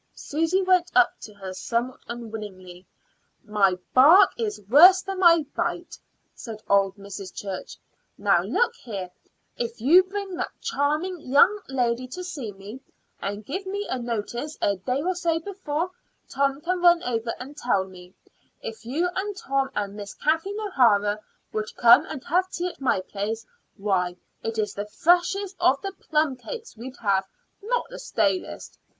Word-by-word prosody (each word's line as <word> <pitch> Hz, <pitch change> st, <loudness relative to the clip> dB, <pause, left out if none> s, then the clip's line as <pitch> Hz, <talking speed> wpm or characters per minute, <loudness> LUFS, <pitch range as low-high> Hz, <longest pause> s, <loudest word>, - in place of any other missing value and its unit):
Susy 330 Hz, +6 st, 0 dB
went 365 Hz, -1 st, +3 dB
up 370 Hz, -1 st, +5 dB
to 215 Hz, -, -9 dB
her 190 Hz, -2 st, -7 dB
somewhat 235 Hz, +6 st, -2 dB
unwillingly. 205 Hz, -6 st, -8 dB, 0.6 s
"My 205 Hz, -4 st, +2 dB, 0.2 s
bark 305 Hz, +10 st, +8 dB
is 440 Hz, -3 st, -3 dB
worse 360 Hz, -, +8 dB
than 385 Hz, -1 st, -4 dB
my 335 Hz, -4 st, +6 dB
bite," -, -, -2 dB, 0.4 s
said 220 Hz, -3 st, -9 dB
old 195 Hz, -1 st, +3 dB
Mrs. 200 Hz, -1 st, -8 dB
Church. 195 Hz, -2 st, -6 dB, 0.4 s
"Now -, -, +3 dB
look 480 Hz, 0 st, +1 dB
here; 195 Hz, -6 st, -6 dB, 0.5 s
if 235 Hz, -1 st, -4 dB
you 305 Hz, +11 st, +7 dB
bring 390 Hz, 0 st, -5 dB
that -, -, -5 dB
charming 345 Hz, -2 st, -1 dB
young 350 Hz, +11 st, +4 dB
lady 250 Hz, -1 st, 0 dB
to 360 Hz, +8 st, -7 dB
see 285 Hz, -, -5 dB
me, 205 Hz, +6 st, -10 dB, 0.4 s
and 205 Hz, +2 st, -4 dB
give 380 Hz, -, -4 dB
me 405 Hz, +2 st, -3 dB
notice 240 Hz, +5 st, -4 dB
a 200 Hz, -1 st, +1 dB
day 255 Hz, +9 st, -2 dB
or 370 Hz, +2 st, +1 dB
so 340 Hz, -2 st, 0 dB
before 360 Hz, -2 st, -3 dB, 0.4 s
Tom 275 Hz, +1 st, 0 dB
can 360 Hz, +2 st, -1 dB
run 345 Hz, -1 st, +5 dB
over 230 Hz, -1 st, -2 dB
and 275 Hz, +3 st, -9 dB
tell 220 Hz, -9 st, +1 dB
me 180 Hz, -1 st, -14 dB, 0.4 s
if 225 Hz, 0 st, -8 dB
you 290 Hz, +10 st, 0 dB
and 400 Hz, +1 st, -3 dB
Tom 270 Hz, -3 st, -1 dB
and 200 Hz, -1 st, -2 dB
Miss 205 Hz, -1 st, -8 dB
Kathleen 325 Hz, +7 st, 0 dB
O'Hara 215 Hz, -, +3 dB, 0.3 s
would 215 Hz, 0 st, -3 dB
come 240 Hz, +6 st, +7 dB
and 285 Hz, -5 st, -7 dB
have 365 Hz, +4 st, +1 dB
tea 360 Hz, 0 st, -2 dB
at 345 Hz, -, -14 dB
my 250 Hz, -8 st, +2 dB
place, 210 Hz, +4 st, -4 dB, 0.3 s
why, 185 Hz, -3 st, 0 dB, 0.3 s
it's 220 Hz, -2 st, -2 dB
the 205 Hz, +1 st, -5 dB
freshest 360 Hz, -, +2 dB
of 270 Hz, +2 st, +4 dB
the 390 Hz, -, -3 dB, 0.2 s
plumcakes 310 Hz, -, -1 dB
we'd 255 Hz, +4 st, -9 dB
have, 195 Hz, -2 st, +2 dB, 0.3 s
not 475 Hz, +4 st, -1 dB
the -, -, -8 dB
stalest. 435 Hz, -6 st, -2 dB
265 Hz, 155 wpm, -25 LUFS, -, 0.6 s, bark